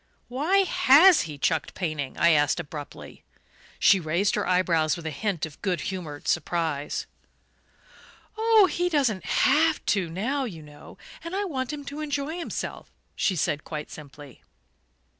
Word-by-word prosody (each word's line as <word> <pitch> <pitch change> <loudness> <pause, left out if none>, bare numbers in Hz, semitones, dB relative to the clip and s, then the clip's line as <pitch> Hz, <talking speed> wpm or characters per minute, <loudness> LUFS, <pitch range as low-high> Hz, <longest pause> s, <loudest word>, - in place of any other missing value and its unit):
"Why 320 +11 +2
HAS 330 +2 +6
he 150 - -7
chucked 160 +2 -1
painting?" 155 -7 -4
I 170 - +4
asked 150 +1 +2
abruptly. 145 -2 -9 0.5
She 195 - +5
raised 175 +5 0
her - - -1
eyebrows 170 -4 +2
with 170 - -10
a 160 - -3
hint 190 0 -2
of 155 -3 -13
good 185 -3 -1
humoured 165 -7 -6
surprise. 160 -4 -1 1.3
"Oh, 445 -2 +5
he 355 +1 -1
doesn't 265 - 0
HAVE 310 +3 +2
to 190 -5 0
now, 245 - -2
you 170 -9 -8
know; 150 0 -14 0.3
and 335 +3 -5
I 405 - 0
want 265 -7 -3
him 290 -1 -7
to 285 +2 -7
enjoy 300 +2 -3
himself," 340 - -6 0.3
she 190 - 0
said 150 -3 -1
quite 150 -1 -7
simply. 145 -3 -12
185 Hz, 150 wpm, -25 LUFS, -, 1.3 s, HAS